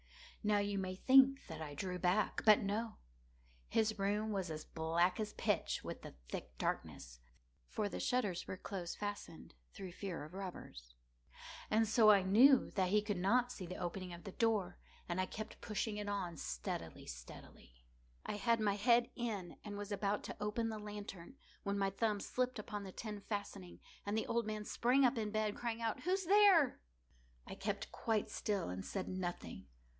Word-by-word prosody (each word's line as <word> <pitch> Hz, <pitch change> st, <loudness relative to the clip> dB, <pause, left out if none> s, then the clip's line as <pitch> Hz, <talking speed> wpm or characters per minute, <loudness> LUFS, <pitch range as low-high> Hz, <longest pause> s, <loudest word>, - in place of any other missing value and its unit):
Now 210 Hz, 0 st, +3 dB
you 200 Hz, -1 st, 0 dB
may 185 Hz, -1 st, -3 dB
think 270 Hz, +5 st, +6 dB
that 160 Hz, -1 st, -7 dB
I 145 Hz, -2 st, -6 dB
drew 180 Hz, +4 st, -3 dB
back—but 210 Hz, +3 st, +4 dB
no. 215 Hz, +3 st, -2 dB, 0.7 s
His 215 Hz, -1 st, +1 dB
room 210 Hz, +2 st, 0 dB
was 190 Hz, -4 st, -1 dB
as 155 Hz, -1 st, -5 dB
black 165 Hz, +4 st, +1 dB
as 215 Hz, -1 st, -2 dB
pitch -, -, 0 dB
with -, -, -6 dB
the -, -, -10 dB
thick -, -, -6 dB
darkness, -, -, -3 dB, 0.5 s
(for 210 Hz, -, -1 dB
the -, -, -5 dB
shutters 225 Hz, -9 st, 0 dB
were 185 Hz, -, -4 dB
close 185 Hz, -3 st, -5 dB
fastened, 205 Hz, -5 st, -6 dB, 0.2 s
through 190 Hz, -2 st, -6 dB
fear 180 Hz, -3 st, -5 dB
of 155 Hz, +3 st, -10 dB
robbers,) 175 Hz, -, -8 dB, 0.7 s
and 220 Hz, +1 st, +3 dB
so 220 Hz, 0 st, +6 dB
I 200 Hz, -2 st, +7 dB
knew 245 Hz, +8 st, +6 dB
that 185 Hz, -2 st, +1 dB
he 210 Hz, +2 st, +3 dB
could 205 Hz, -3 st, -2 dB
not 245 Hz, +7 st, +3 dB
see 185 Hz, -7 st, -6 dB
the 180 Hz, -, -5 dB
opening 180 Hz, +1 st, -4 dB
of 170 Hz, 0 st, -9 dB
the 195 Hz, -, -6 dB
door, 205 Hz, -5 st, +1 dB, 0.3 s
and 175 Hz, +1 st, 0 dB
I 185 Hz, -, -1 dB
kept 215 Hz, +3 st, -7 dB
pushing 210 Hz, 0 st, -2 dB
it 205 Hz, -1 st, -3 dB
on 190 Hz, -4 st, -2 dB
steadily, -, -, -4 dB
steadily. -, -, -11 dB, 0.4 s
I -, -, -3 dB
had 230 Hz, +1 st, +2 dB
my 210 Hz, -2 st, +2 dB
head 240 Hz, +3 st, +4 dB
in, 215 Hz, -8 st, -3 dB
and 205 Hz, -1 st, -6 dB
was 205 Hz, 0 st, -5 dB
about 205 Hz, 0 st, 0 dB
to -, -, -6 dB
open 225 Hz, +2 st, 0 dB
the 220 Hz, -1 st, -4 dB
lantern, 205 Hz, -1 st, -7 dB, 0.3 s
when 200 Hz, 0 st, -1 dB
my 195 Hz, -1 st, +1 dB
thumb 210 Hz, +1 st, 0 dB
slipped 255 Hz, +4 st, -1 dB
upon 210 Hz, -1 st, -5 dB
the 190 Hz, -, -7 dB
tin 210 Hz, 0 st, -6 dB
fastening, 200 Hz, -3 st, -5 dB, 0.2 s
and 205 Hz, +2 st, -1 dB
the 220 Hz, -, 0 dB
old 235 Hz, -1 st, 0 dB
man 215 Hz, -1 st, -3 dB
sprang 255 Hz, +5 st, +3 dB
up 245 Hz, -1 st, +3 dB
in 215 Hz, -1 st, -1 dB
bed, 215 Hz, -1 st, 0 dB
crying 235 Hz, -1 st, -3 dB
out—"Who's 360 Hz, -, 0 dB
there?" 385 Hz, -6 st, +6 dB, 0.6 s
I -, -, -7 dB
kept -, -, -3 dB
quite 220 Hz, -2 st, -1 dB
still 200 Hz, -, -1 dB
and 90 Hz, +1 st, -4 dB
said 190 Hz, -2 st, -4 dB
nothing. 175 Hz, -, -4 dB
205 Hz, 180 wpm, -37 LUFS, 185-220 Hz, 0.7 s, I